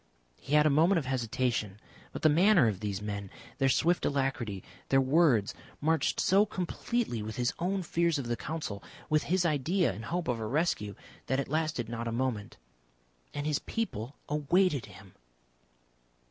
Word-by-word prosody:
He 145 - -1
had 150 0 +6
a 155 - +4
moment 165 +7 +4
of 155 - -1
hesitation. 120 -5 -1 0.3
But - - -7
the - - +7
manner 175 - +5
of 100 -4 -1
these 105 -1 -3
men, 100 -2 -4 0.3
their 135 - +3
swift 170 +6 +2
alacrity, 135 -8 -1 0.3
their 135 - +5
words, 135 - +3 0.3
marched 160 +2 +1
so 195 +2 +4
completely 200 - -2
with 110 +1 -5
his 120 -1 0
own 185 +2 -1
fears 170 -1 +1
of 140 - -3
the 120 0 -1
Council, 150 -9 -5 0.3
with 155 0 +4
his 180 0 +2
idea 165 - +1
and 110 +4 -8
hope 175 +4 -2
of 125 -3 0
a 110 - -3
rescue, 115 - 0 0.3
that 130 +1 +1
it 140 - -2
lasted 155 -6 -1
not 115 0 -4
a - - -2
moment. 115 -4 -2 0.8
And 145 - -3
his 150 -1 +1
people 140 - -4
awaited 150 0 +1
him! - - -14
140 Hz, 170 wpm, -30 LUFS, 115-165 Hz, 0.8 s, the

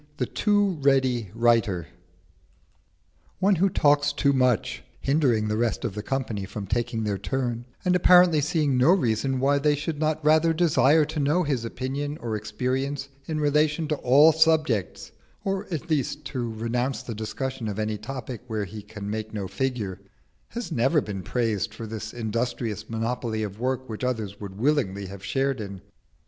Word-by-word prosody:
THE 125 - 0
TOO 205 - +1
READY 130 -6 +2
WRITER 115 -7 +2 1.5
One 195 0 +3
who 195 +4 +3
talks 145 -3 +3
too 140 -1 +2
much, 125 -5 +1 0.2
hindering 135 -7 +2
the 105 0 -1
rest 115 0 0
of 100 - -2
the 105 - -4
company 115 -4 -2
from 100 +1 -6
taking 115 +2 -1
their 100 -2 -1
turn, 120 +1 -2 0.2
and 180 0 +3
apparently 180 -3 +6
seeing 150 -4 +1
no 130 - +5
reason 130 - +1
why 140 +2 +3
they 150 +1 +3
should 150 +1 -4
not 155 0 0
rather 160 +2 +5
desire 160 -2 +4
to 155 +1 -4
know 150 +6 +2
his 135 -6 -1
opinion 140 +5 -3
or 115 -5 -3
experience 130 +6 -2 0.2
in 155 -1 -2
relation 150 +2 +2
to 155 - +1
all 145 +6 +6
subjects, 155 - +1 0.3
or 195 +1 -1
at 165 -6 -4
least 150 0 -1
to 120 -5 -3
renounce 120 +4 -2
the 115 - -5
discussion 115 +3 -4
of 105 -1 -4
any 110 -1 -2
topic 125 +1 -6
where 110 -3 -2
he 105 +3 -8
can 105 0 -8
make 110 +1 -4
no 100 -2 -3
figure, 105 -2 -3 0.5
has 235 -6 -6
never 135 +3 +3
been 100 -7 -5
praised 110 -1 -1
for 115 - -6
this 110 0 -6
industrious 115 -2 -3
monopoly 115 -1 -2
of 105 0 -6
work 130 +1 -1
which 110 +2 -6
others 110 -5 -2
would 100 -2 -7
willingly 110 -7 +1
have 95 0 -9
shared 135 +3 0
in. 100 -2 -7
125 Hz, 170 wpm, -25 LUFS, 110-150 Hz, 1.5 s, apparently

